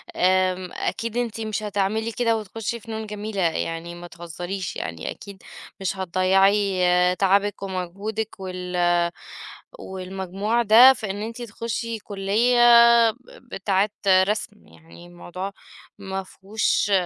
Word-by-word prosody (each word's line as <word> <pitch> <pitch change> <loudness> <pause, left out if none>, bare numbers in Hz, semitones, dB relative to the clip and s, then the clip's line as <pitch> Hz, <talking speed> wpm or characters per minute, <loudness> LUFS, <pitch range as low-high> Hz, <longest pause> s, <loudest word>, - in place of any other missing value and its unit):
آمم 185 0 +1
أكيد 230 +1 -3
أنتِ 230 -2 -2
مش 215 -1 -3
هتعملي 210 +2 -1
كده، 230 -1 +1
وتخشي 225 +2 -5
فنون 220 -1 -6
جميلة 210 -1 -4
يعني، 165 0 -2
ما 175 0 -9
تهزريش، 175 +2 -6
يعني 80 0 -5
أكيد 200 -2 -11 0.4
مش 195 0 -2
هتضيّعي 190 +2 +2 0.4
تعبِك، 200 +1 +1
ومجهودِك، 200 +4 -4
وال 180 -1 -5 1.0
والمجموع 190 +4 -3
ده، 235 +4 +8
في 215 -6 -5
إن 205 +1 -6
أنتِ 230 +2 -6
تخشِ 230 +1 -4 0.2
كلية 210 +5 +1 0.5
ب - - -20 0.3
بتاعة 195 0 0 0.2
رسم. 205 +3 +1
يعني 170 +1 -16
الموضوع 175 +2 -7 0.5
ما 195 -1 -5
فيهوش 205 +2 -1
195 Hz, 115 wpm, -23 LUFS, 185-220 Hz, 1.0 s, ده